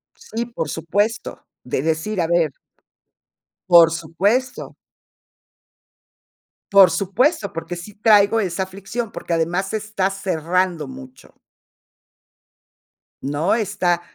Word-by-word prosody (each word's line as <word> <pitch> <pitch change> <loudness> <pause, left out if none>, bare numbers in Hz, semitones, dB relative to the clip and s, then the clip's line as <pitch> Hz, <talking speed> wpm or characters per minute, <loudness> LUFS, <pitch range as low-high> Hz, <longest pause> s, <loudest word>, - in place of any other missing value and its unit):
Sí, 235 - -5
por 230 -9 -5
supuesto, 205 +8 -2 0.2
de 125 - -2
decir, 160 +6 -1
a 165 - 0
ver 170 -3 +2 1.2
Por 170 -2 +8
supuesto. 195 +11 -1 2.0
Por 195 -3 +7
supuesto, 200 - 0
porque, 165 0 -6
sí 175 +4 -10
traigo 210 0 +4
esa 190 -2 -1
aflicción, 200 +4 -6
porque, - - -5
además 175 +5 -1
está 215 -3 -1
cerrando 180 -3 -1
mucho 130 0 -12 1.9
¿no?, 145 +7 0
está 190 -5 0
185 Hz, 100 wpm, -21 LUFS, 165-210 Hz, 2.0 s, Por